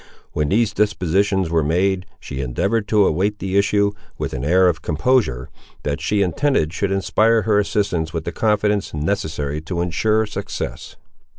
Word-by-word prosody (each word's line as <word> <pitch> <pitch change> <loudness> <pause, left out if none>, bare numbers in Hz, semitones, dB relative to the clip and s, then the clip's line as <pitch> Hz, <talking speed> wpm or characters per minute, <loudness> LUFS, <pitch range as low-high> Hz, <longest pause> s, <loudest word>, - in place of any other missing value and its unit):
When 75 -1 -1
these 110 0 +2
dispositions 95 -2 +1
were 80 -1 +3
made, 90 +5 0
she 70 0 -6
endeavoured 100 - -1
to 105 -2 +4
await 100 +6 0
the 95 -1 -3
issue, 100 0 +3 0.3
with - - -4
an 65 -2 -4
air 90 +5 +4
of 85 -2 0
composure, 75 - +1 0.4
that 75 0 -2
she 100 +5 +1
intended 90 - 0
should 100 0 -1
inspire 110 +3 +2
her 105 -1 +3
assistants 100 -6 -1
with 80 -2 -3
the 85 - -4
confidence 105 -1 0
necessary 75 -3 -2
to 85 +2 -4
ensure 105 +6 +1
success. 105 - -6
95 Hz, 160 wpm, -20 LUFS, 80-105 Hz, 0.4 s, to